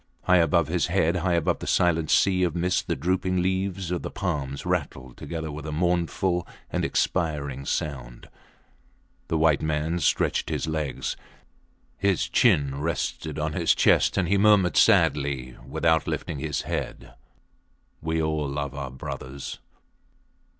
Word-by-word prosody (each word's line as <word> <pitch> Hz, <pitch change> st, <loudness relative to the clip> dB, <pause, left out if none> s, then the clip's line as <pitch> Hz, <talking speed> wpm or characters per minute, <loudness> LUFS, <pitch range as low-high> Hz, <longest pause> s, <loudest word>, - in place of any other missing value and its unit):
High 90 Hz, 0 st, +4 dB
above 85 Hz, -1 st, +3 dB
his 85 Hz, +2 st, 0 dB
head, 90 Hz, -1 st, +1 dB
high 90 Hz, 0 st, +1 dB
above 85 Hz, -, +1 dB
the -, -, -7 dB
silent 80 Hz, -3 st, +2 dB
sea 95 Hz, -1 st, +3 dB
of 90 Hz, -3 st, +1 dB
mist 90 Hz, +1 st, 0 dB
the -, -, 0 dB
drooping 90 Hz, +5 st, 0 dB
leaves 95 Hz, 0 st, -1 dB
of 90 Hz, -, -1 dB
the -, -, -5 dB
palms 75 Hz, -8 st, -3 dB
rattled 65 Hz, -1 st, -3 dB
together 80 Hz, -2 st, -5 dB
with 75 Hz, +1 st, -7 dB
a -, -, -3 dB
mournful 85 Hz, +2 st, 0 dB, 0.2 s
and -, -, -1 dB
expiring 75 Hz, -6 st, -1 dB
sound. 65 Hz, -6 st, -4 dB, 1.0 s
The 80 Hz, -, 0 dB
white 80 Hz, -2 st, +3 dB
man 80 Hz, +2 st, -1 dB
stretched 75 Hz, -, +1 dB
his -, -, -2 dB
legs. 80 Hz, -3 st, -3 dB, 0.8 s
His 100 Hz, -4 st, +1 dB
chin 70 Hz, -1 st, +2 dB
rested 80 Hz, -1 st, -3 dB
on 75 Hz, 0 st, -2 dB
his -, -, +2 dB
chest, -, -, +3 dB
and 95 Hz, -3 st, +2 dB
he 100 Hz, +2 st, +2 dB
murmured 100 Hz, -4 st, +4 dB
sadly 70 Hz, -3 st, +3 dB
without 80 Hz, +2 st, +1 dB
lifting 75 Hz, -, -3 dB
his 75 Hz, 0 st, -2 dB
head -, -, -5 dB, 0.9 s
We 80 Hz, +1 st, -1 dB
all 80 Hz, -2 st, -1 dB
love 70 Hz, -1 st, -3 dB
our 70 Hz, -1 st, -5 dB
brothers. 65 Hz, +1 st, -7 dB
80 Hz, 145 wpm, -25 LUFS, 70-90 Hz, 1.0 s, High